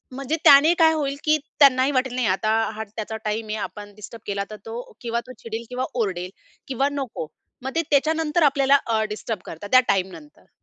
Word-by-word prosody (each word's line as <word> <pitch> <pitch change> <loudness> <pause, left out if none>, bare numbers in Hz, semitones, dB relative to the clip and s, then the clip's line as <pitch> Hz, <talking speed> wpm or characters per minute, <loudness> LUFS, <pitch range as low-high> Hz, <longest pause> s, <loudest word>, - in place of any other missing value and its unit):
म्हणजे 275 +3 -2
त्याने 290 +4 +8
काय 320 0 +6
होईल, 280 -3 -1
की 310 0 +3 0.2
त्यांनाही 270 -1 +5
वाटेल 255 -2 0
नाही 255 -3 0
आता 205 +4 +1 0.2
हा 220 - -4
त्याचा 220 0 -4
टाईम 215 +1 -2
आहे, 215 - -3
आपण 205 0 -7
डिस्टर्ब 215 +1 -10
केला 200 0 -1
तर - - -6
तो 230 +2 -5 0.2
किंवा 235 -1 -2
तो 255 - -9
चिडेल 230 0 -6
किंवा 250 +1 -2
ओरडेल 185 -6 -2 0.4
किंवा 270 +2 0
नको. 265 - -4 0.4
मग 265 - -3
ते 330 - +3
त्याच्यानंतर 315 +2 +2
आपल्याला 275 0 +4
अ, 220 -1 +1
डिस्टर्ब 215 -1 -4
करतात 165 +5 -8
त्या 255 - +9
टाईमनंतर. 195 +10 -3
250 Hz, 190 wpm, -23 LUFS, 215-280 Hz, 0.4 s, त्या